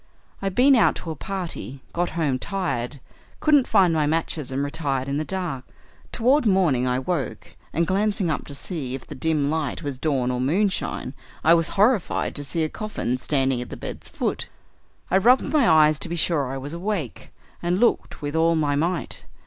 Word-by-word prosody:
I'd 195 Hz, -1 st, -2 dB
been 270 Hz, +2 st, +6 dB
out 235 Hz, -, +4 dB
to 165 Hz, -, -6 dB
a -, -, -5 dB
party, 170 Hz, -7 st, -5 dB
got 175 Hz, +1 st, 0 dB
home 140 Hz, -6 st, +1 dB
tired, 145 Hz, -8 st, -3 dB, 0.4 s
couldn't 295 Hz, -4 st, +4 dB
find 190 Hz, -5 st, +4 dB
my 155 Hz, -2 st, +2 dB
matches, 155 Hz, -3 st, -2 dB
and 135 Hz, +2 st, -1 dB
retired 140 Hz, -3 st, -2 dB
in 140 Hz, +1 st, -1 dB
the 155 Hz, -, 0 dB
dark. 175 Hz, -7 st, -3 dB, 0.5 s
Toward 255 Hz, +3 st, +3 dB
morning 165 Hz, -11 st, +3 dB
I 125 Hz, 0 st, +1 dB
woke, 135 Hz, -1 st, -3 dB, 0.2 s
and 170 Hz, +2 st, +1 dB
glancing 195 Hz, -1 st, 0 dB
up -, -, -3 dB
to 140 Hz, -, -7 dB
see 140 Hz, -5 st, -4 dB
if 135 Hz, -, -9 dB
the -, -, -8 dB
dim 145 Hz, 0 st, 0 dB
light 155 Hz, -4 st, -2 dB
was 140 Hz, -3 st, -4 dB
dawn 135 Hz, -5 st, 0 dB
or 125 Hz, 0 st, -1 dB
moonshine 180 Hz, -1 st, 0 dB, 0.3 s
I 165 Hz, -, +6 dB
was 165 Hz, -1 st, +3 dB
horrified 210 Hz, -1 st, +2 dB
to 145 Hz, -, -4 dB
see 160 Hz, +3 st, -1 dB
a -, -, +1 dB
coffin 155 Hz, -, -3 dB
standing 135 Hz, -3 st, +1 dB
at 125 Hz, -, -7 dB
the -, -, -7 dB
bed's -, -, -7 dB
foot. -, -, -2 dB, 0.6 s
I 190 Hz, -, +5 dB
rubbed 250 Hz, +9 st, +4 dB
my 290 Hz, -6 st, +4 dB
eyes 155 Hz, -1 st, +5 dB
to -, -, -3 dB
be 170 Hz, -, -2 dB
sure 160 Hz, -4 st, +1 dB
I 135 Hz, +1 st, -4 dB
was 140 Hz, +3 st, -6 dB
awake, 170 Hz, -, -4 dB, 0.3 s
and 175 Hz, +1 st, 0 dB
looked 235 Hz, -7 st, +1 dB
with 145 Hz, +1 st, -3 dB
all 165 Hz, +1 st, +3 dB
my 150 Hz, -3 st, +1 dB
might. 170 Hz, +3 st, -2 dB
160 Hz, 195 wpm, -24 LUFS, 140-190 Hz, 0.6 s, been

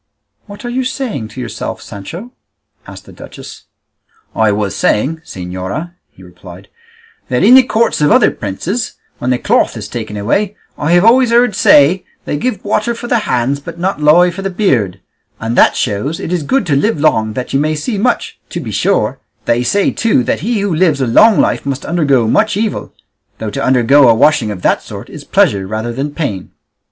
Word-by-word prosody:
"What 205 Hz, +4 st, -10 dB
are -, -, -3 dB
you 255 Hz, +2 st, -1 dB
saying 250 Hz, -, -4 dB
to 110 Hz, +4 st, -11 dB
yourself, 120 Hz, -2 st, -5 dB
Sancho?" 170 Hz, -, -9 dB, 0.6 s
asked -, -, -11 dB
the -, -, -14 dB
duchess. -, -, -12 dB, 0.7 s
"I 110 Hz, -2 st, +2 dB
was 100 Hz, -1 st, -2 dB
saying, 135 Hz, +10 st, 0 dB
señora," 95 Hz, -, -6 dB, 0.2 s
he 95 Hz, -, -18 dB
replied, 90 Hz, +1 st, -14 dB, 0.6 s
"that 125 Hz, +5 st, 0 dB
in 225 Hz, +5 st, +6 dB
the 260 Hz, -, +9 dB
courts 235 Hz, -7 st, 0 dB
of 150 Hz, -, +3 dB
other -, -, +5 dB
princes, 165 Hz, -, -4 dB, 0.3 s
when 125 Hz, -, -2 dB
the 125 Hz, -, +2 dB
cloth -, -, +1 dB
is -, -, -6 dB
taken 105 Hz, -, -6 dB
away, 195 Hz, -, -1 dB, 0.2 s
I 155 Hz, +3 st, 0 dB
have 175 Hz, +3 st, +4 dB
always 250 Hz, +2 st, +5 dB
heard 235 Hz, -2 st, +3 dB
say 150 Hz, +6 st, +4 dB, 0.2 s
they -, -, -2 dB
give 210 Hz, +5 st, -3 dB
water 215 Hz, +3 st, 0 dB
for 235 Hz, -, -8 dB
the 240 Hz, -1 st, +1 dB
hands, 125 Hz, +3 st, 0 dB
but 165 Hz, +4 st, -9 dB
not 180 Hz, -2 st, -2 dB
lye 170 Hz, +4 st, +5 dB
for 195 Hz, -, -7 dB
the 195 Hz, -, -2 dB
beard; 135 Hz, -, 0 dB, 0.4 s
and 115 Hz, +1 st, -3 dB
that -, -, +4 dB
shows 125 Hz, +8 st, -2 dB
it 175 Hz, -, -4 dB
is 175 Hz, -, 0 dB
good 260 Hz, -, 0 dB
to 150 Hz, -4 st, +1 dB
live 180 Hz, +5 st, 0 dB
long 110 Hz, -8 st, +1 dB
that 125 Hz, +2 st, -5 dB
you 135 Hz, -, +2 dB
may 155 Hz, +2 st, 0 dB
see 200 Hz, +8 st, -3 dB
much; 245 Hz, +5 st, -1 dB
to -, -, -5 dB
be -, -, -6 dB
sure, -, -, 0 dB, 0.3 s
they 120 Hz, +1 st, +1 dB
say 200 Hz, +10 st, +1 dB
too 220 Hz, -, +1 dB
that -, -, -1 dB
he 215 Hz, +4 st, -1 dB
who 200 Hz, -3 st, -1 dB
lives 160 Hz, -3 st, +2 dB
a 130 Hz, -, +1 dB
long 210 Hz, -, +5 dB
life -, -, +1 dB
must 140 Hz, -1 st, -4 dB
undergo 140 Hz, -9 st, +1 dB
much 210 Hz, -, +1 dB
evil, 215 Hz, 0 st, -3 dB, 0.5 s
though 110 Hz, -2 st, -5 dB
to -, -, -3 dB
undergo 130 Hz, +1 st, +4 dB
a 115 Hz, -, +5 dB
washing 115 Hz, -3 st, +3 dB
of 95 Hz, -4 st, -6 dB
that -, -, +2 dB
sort -, -, -10 dB
is -, -, -9 dB
pleasure 95 Hz, -2 st, +1 dB
rather 110 Hz, +3 st, -4 dB
than 135 Hz, +4 st, -3 dB
pain." 140 Hz, -, -4 dB
150 Hz, 200 wpm, -14 LUFS, -, 0.7 s, the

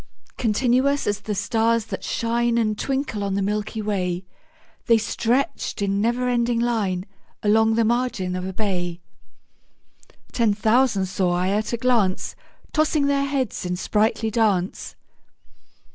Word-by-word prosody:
Continuous 255 Hz, +5 st, +1 dB
as 205 Hz, -1 st, 0 dB
the 210 Hz, -, -4 dB
stars 225 Hz, +2 st, +1 dB
that -, -, -6 dB
shine 235 Hz, 0 st, 0 dB
And 215 Hz, -2 st, +1 dB
twinkle 265 Hz, -4 st, -2 dB
on 200 Hz, -1 st, -1 dB
the 200 Hz, -, 0 dB
milky 210 Hz, +2 st, -2 dB
way, 185 Hz, -3 st, -2 dB, 0.6 s
The 230 Hz, -1 st, +6 dB
stretched 235 Hz, +4 st, -1 dB
in 200 Hz, 0 st, 0 dB
never 240 Hz, +3 st, +1 dB
ending 240 Hz, -1 st, +1 dB
line 210 Hz, -6 st, 0 dB, 0.4 s
Along 220 Hz, +1 st, +4 dB
the 230 Hz, 0 st, +3 dB
margin 230 Hz, -6 st, 0 dB
of 180 Hz, -, -3 dB
a 190 Hz, -, -3 dB
bay: 180 Hz, -4 st, -2 dB, 1.3 s
Ten 225 Hz, -4 st, +2 dB
thousand 220 Hz, -1 st, +2 dB
saw 185 Hz, -1 st, 0 dB
I 180 Hz, +1 st, 0 dB
at 210 Hz, +2 st, 0 dB
a 235 Hz, -, -1 dB
glance, 230 Hz, -6 st, +1 dB, 0.4 s
Tossing 305 Hz, -2 st, +2 dB
their 280 Hz, 0 st, +2 dB
heads 275 Hz, -5 st, -2 dB
in 180 Hz, 0 st, -2 dB
sprightly 220 Hz, +3 st, 0 dB
dance. 205 Hz, -5 st, 0 dB
220 Hz, 140 wpm, -23 LUFS, 200-240 Hz, 1.3 s, The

